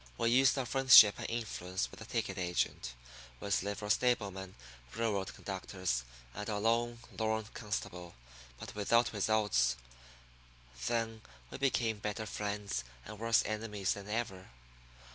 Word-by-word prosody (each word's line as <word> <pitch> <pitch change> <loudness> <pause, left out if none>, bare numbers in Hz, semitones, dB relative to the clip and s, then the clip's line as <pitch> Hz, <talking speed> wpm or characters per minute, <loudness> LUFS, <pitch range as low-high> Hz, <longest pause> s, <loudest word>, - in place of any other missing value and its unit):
We 115 - +2
used 130 +1 +5
our 135 - 0
friendship 130 -5 +8
and - - -4
influence 95 -6 -3
with - - -12
the - - -9
ticket - - -2
agent, 90 -8 -1 0.4
with 100 +7 0
livery 105 +1 -3
stable 120 -4 +2
men, 95 0 -8 0.4
railroad 100 -4 -1
conductors, 95 -9 -3 0.3
and 105 +2 -5
our 105 - -1
one - - -5
lone, 120 +1 +1 0.2
lorn 110 0 0
constable, 90 -5 -5 0.4
but - - -8
without 115 +4 +2
results. 105 - +2 1.1
Then 115 -1 -1 0.3
we - - -7
became 115 -5 +1
better 105 +1 -3
friends 105 - -3 0.2
and 105 0 -9
worse 115 0 +3
enemies 105 -3 -1
than 100 0 -9
ever. 105 -4 -3
105 Hz, 140 wpm, -33 LUFS, 100-115 Hz, 1.1 s, friendship